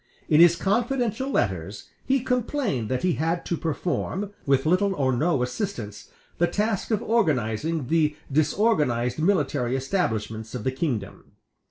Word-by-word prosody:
In 155 - +4
his 170 0 +7
confidential 240 +6 0
letters 95 - -2
he 270 -1 +1
complained 245 - -1
that 130 -1 -1
he 180 -2 +2
had 165 +2 -1
to 170 - -1
perform, 175 +5 -2 0.2
with 135 0 +3
little 190 +4 +2
or 130 -4 +1
no 150 -1 +1
assistance, 125 - -5 0.3
the 175 - +4
task 205 +3 -1
of 220 -1 0
organizing 155 - 0
the 150 +1 +2 0.2
disorganized 150 - +1
military 150 -8 +1
establishments 115 - -2
of 120 - -4
the 130 - 0
kingdom. 130 - -4
160 Hz, 140 wpm, -25 LUFS, 125-200 Hz, 0.3 s, his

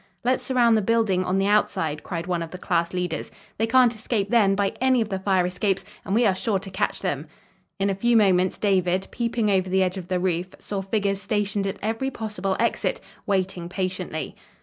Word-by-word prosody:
"Let's 255 +2 +2
surround 240 -4 +3
the 215 - +3
building 210 -3 +2
on 185 +1 0
the 195 - +2
outside," 165 -7 +1
cried 170 -2 -4
one 175 -2 -1
of 165 - -5
the 180 - -8
class 170 -2 0
leaders. 180 -3 -3 0.3
"They 225 - +2
can't 245 0 +5
escape, 215 -2 -2
then, 205 -5 +4
by 200 0 0
any 260 -1 +4
of 220 -2 -1
the 190 -2 -2
fire 190 -2 +2
escapes, 190 +2 -1 0.2
and 195 - -1
we 235 +1 +4
are 200 - +4
sure 195 +2 0
to 195 0 -8
catch 185 - -1
them!" - - -2 0.5
In 195 -1 +1
a 200 - +1
few 235 +4 +2
moments, 185 -3 +3
David 185 -2 +1
peeping 235 -3 0
over 185 -1 +1
the 190 +1 +3
edge 185 +1 -1
of 180 -2 -7
the 185 0 0
roof, 180 0 -1
saw 200 -2 -4
figures 195 0 -1
stationed 205 0 -1
at 195 - -3
every 225 +5 -1
possible 210 -6 -3
exit, - - 0 0.3
waiting 185 -3 -1
patiently. 185 -4 -3
195 Hz, 210 wpm, -24 LUFS, 185-220 Hz, 0.5 s, can't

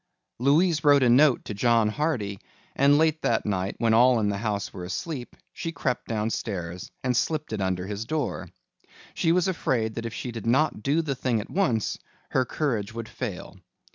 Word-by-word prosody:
Louise 155 +5 +3
wrote 145 -2 +6
a 125 - +4
note 135 +2 +5
to - - -5
John 115 +1 +3
Hardy 110 -7 -2 0.4
and 140 +1 +5
late 160 0 +2
that 115 - +1
night, 95 -1 -1
when 115 -2 +2
all 120 +1 +5
in 105 -2 +1
the 100 - -1
house 105 -2 -2
were 90 - -7
asleep, 125 - -5 0.2
she 165 - -4
crept 135 -5 -2
downstairs 100 -5 -3
and 125 -1 +1
slipped 155 0 -1
it 105 - -2
under 95 -1 -1
his 105 +2 -4
door. 155 +4 -3 0.6
She 165 - +1
was 180 +1 +2
afraid 120 -11 0
that 115 +1 -4
if 115 - -7
she 125 - -4
did 115 -2 -6
not 135 0 +2
do 145 +7 +1
the 145 -3 -1
thing 125 -3 0
at 105 - -7
once 160 - 0 0.3
her 130 -1 +2
courage 115 -7 -2
would 115 -1 -5
fail. 100 -5 -6
120 Hz, 190 wpm, -26 LUFS, 105-145 Hz, 0.6 s, wrote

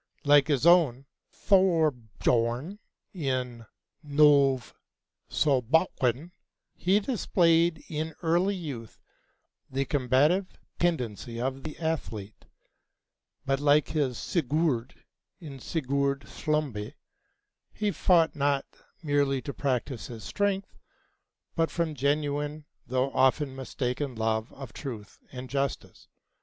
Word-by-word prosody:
Like 145 -1 +6
his 145 -2 +1
own 155 -7 +5 0.3
Thorbjörn 150 - +1 0.3
in 130 - -3 0.4
'Synnöve 140 -3 +4 0.6
Solbakken,' 140 +1 +1 0.4
he 190 +3 +2
displayed 170 -8 +2
in 155 0 -4
early 175 +5 +2
youth 135 - -7 0.7
the 135 +1 -1
combative 145 +8 +1 0.2
tendency 120 - -1
of 130 +2 -2
the 155 +1 -7
athlete; 115 -11 -4 1.0
but 135 0 +1
like 145 0 +3
his 140 -5 -1
Sigurd 150 -5 -1 0.4
in 145 -6 -9
'Sigurd 140 -1 -1
Slembe,' 145 -9 -3 0.8
he 210 -1 -1
fought 170 -5 +3
not 140 -1 +1 0.4
merely 145 -2 +1
to 140 - -5
practice 130 -2 -2
his 115 -4 -9
strength, 200 - -2 0.8
but 165 -1 +1
from 170 -2 -1
genuine 145 +2 -1 0.2
though 130 +2 0
often 130 +1 +2
mistaken 130 0 -3
love 110 0 -1
of 135 -4 -10
truth 110 -8 -8
and 130 0 -7
justice. 140 0 -3
140 Hz, 100 wpm, -28 LUFS, 130-160 Hz, 1.0 s, Like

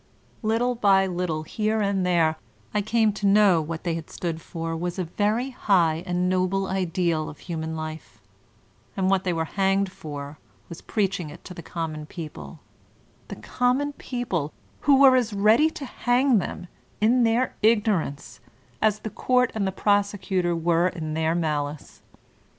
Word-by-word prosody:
Little 230 +3 +1
by 195 -4 +4
little, 175 -4 -2
here 215 +6 -1
and 200 -2 0
there, 165 -3 +2 0.4
I 210 - +1
came 220 0 +2
to 205 0 -1
know 200 -3 +5
that 155 - -4
what 165 0 -5
they 170 -2 -1
had 165 -1 -6
stood 165 -2 -4
for 165 0 -5
was 175 +2 -3
a 185 - -1
very 215 +9 -1
high 170 -9 +2
and 180 0 0
noble 185 +1 +1
ideal 175 -4 -1
of 145 - -11
human 160 -2 -4
life, 155 -6 -7 0.8
and 190 0 +2
what 195 -1 +1
they 180 - +1
were 165 -1 -1
hanged 195 +1 +1
for 145 -3 -8 0.3
was 170 - -9
preaching 195 -6 -1
it - - -13
to 180 - -8
the 175 - -8
common 155 -2 -5
people, 150 - -9 0.3
— - - -34
the - - -7
common 250 - 0
people 215 - -3 0.3
who 280 -2 +4
were 270 -2 +8
as 235 -4 +1
ready 220 +10 +4
to 295 -3 -7
hang 245 -1 +2
them, 180 - -5 0.3
in 235 +4 +3
their 235 +2 +2
ignorance, 205 - +1 0.4
as 215 -1 +2
the 220 - -5
court 250 +2 +2
and 205 -3 -1
the - - -1
prosecutor 195 -3 0
were 170 +1 +2
m 155 -3 -4
their 160 +1 0
malice 150 -3 -3
185 Hz, 165 wpm, -25 LUFS, 165-215 Hz, 0.8 s, were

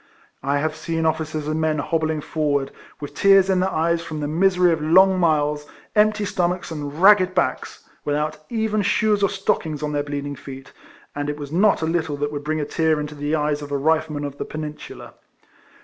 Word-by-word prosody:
I 140 +2 0
have 155 +1 -1
seen 165 -1 -3
officers 155 -1 -1
and 155 +1 -1
men 155 -1 +1
hobbling 160 +1 -1
forward, 145 -3 -1 0.3
with 145 -2 -7
tears 195 -1 +5
in 185 - +2
their 185 +1 +1
eyes 165 0 0
from 155 -2 -6
the 145 - -2
misery 180 +2 +3
of 160 -2 -1
long 185 +4 +5
miles, 150 -3 +1 0.3
empty 210 0 +3
stomachs, 180 -2 -1
and 150 -1 -6
ragged 190 -1 +5
backs, 130 -8 -2 0.2
without 150 +1 -2
even 220 -2 0
shoes 205 +1 +1
or 200 - +3
stockings 195 -6 -2
on 150 - -2
their 145 -1 0
bleeding 145 0 -4
feet, 135 -1 -11 0.4
and 145 0 -3
it 150 - -3
was 145 -1 -8
not 190 +1 +3
a - - +2
little 160 -3 -1
that 145 +1 -2
would 145 -1 -5
bring 155 +1 -1
a 150 - -1
tear 160 +1 +1
into 150 0 -5
the 145 +1 -2
eyes 150 -1 -1
of 145 0 -8
a 140 - 0
Rifle 155 +1 +1
man 145 - -4
of 145 -1 -6
the - - -3
Peninsular. 150 -1 -8
155 Hz, 205 wpm, -22 LUFS, 145-180 Hz, 0.4 s, tears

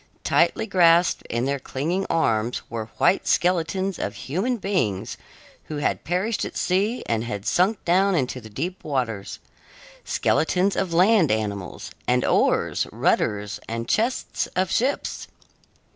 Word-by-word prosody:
Tightly - - +2
grasped 175 -3 +4
in 120 +2 -1
their 140 0 -1
clinging 165 +9 -2
arms 115 -7 0
were 115 -2 -4
white 190 - +2
skeletons 185 +2 +1
of 100 - -3
human 190 - -2
beings 180 - -1 0.5
who 155 - -5
had 145 - -1
perished 185 +7 -1
at - - -5
sea 200 +7 0
and 115 -1 -1
had 105 -4 -5
sunk 190 +4 +1
down 190 +3 +3
into 130 -4 -1
the 110 - -11
deep 170 - -5
waters; 115 -9 -3 0.7
skeletons 185 +5 +1
of 190 -3 -1
land 180 0 +4
animals; 105 -3 -3 0.2
and 125 0 +2
oars, - - +2
rudders, 105 0 0
and 115 +1 -3
chests, 235 +4 0
of 185 0 0
ships. 265 +4 -1
165 Hz, 135 wpm, -24 LUFS, 115-190 Hz, 0.7 s, grasped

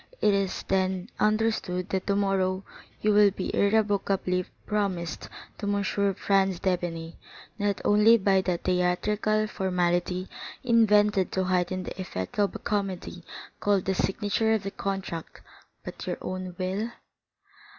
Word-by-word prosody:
It 210 - +4
is 195 -1 -1
then 190 +1 0
understood 215 -4 +1
that 190 -1 -2
tomorrow 195 -2 +1 0.4
you 210 0 +3
will 205 0 +7
be 190 -1 -4
irrevocably 200 -3 +1 0.2
promised 190 -6 -2 0.3
to 205 -1 -1
M. 200 0 0 0.3
Franz 195 -2 +2
d'Épinay, 170 -3 -2 0.4
not 205 -1 0
only 210 +3 +6
by 195 -2 +3
that 180 -2 -2
theatrical 205 +4 +1
formality 180 -2 0 0.4
invented 210 -5 +4
to 190 - +1
heighten 185 0 0
the 190 - -6
effect 95 - -5
of 200 -1 +2
a - - -1
comedy 195 -4 -3 0.4
called 200 -2 +1
the 190 - +1
signature 210 +3 +1
of 215 - -2
the 195 - -4
contract, 195 -5 -5 0.4
but - - -8
your - - -2
own 185 -1 -5
will?" 195 +5 -2
195 Hz, 130 wpm, -27 LUFS, 185-205 Hz, 0.4 s, will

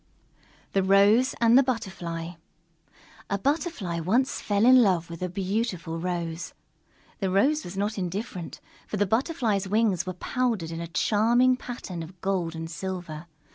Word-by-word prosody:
_ - - -37
THE 195 - +3
ROSE 200 +7 +4
AND 230 0 +5
THE 270 - +8
BUTTERFLY 180 -9 -4 0.9
A 200 - 0
Butterfly 270 - -1
once 230 +11 +1
fell 205 +1 +1
in 255 0 +8
love 175 -6 +1
with 170 - -8
a 180 - -1
beautiful 185 -3 -2
Rose. 170 -1 -4 0.6
The 195 - 0
Rose 275 +12 +2
was 185 +2 -8
not 205 +1 -1
indifferent, 185 -1 -5 0.3
for 210 - -3
the 205 - +2
Butterfly's 225 - 0
wings 205 -5 +1
were 185 - -2
powdered 215 -3 -1
in 165 0 -5
a 170 - -5
charming 235 +8 +3
pattern 235 -9 -7
of 175 +3 -10
gold 180 -4 -1
and 165 0 -5
silver. 170 -1 -6
195 Hz, 155 wpm, -26 LUFS, 170-230 Hz, 0.9 s, THE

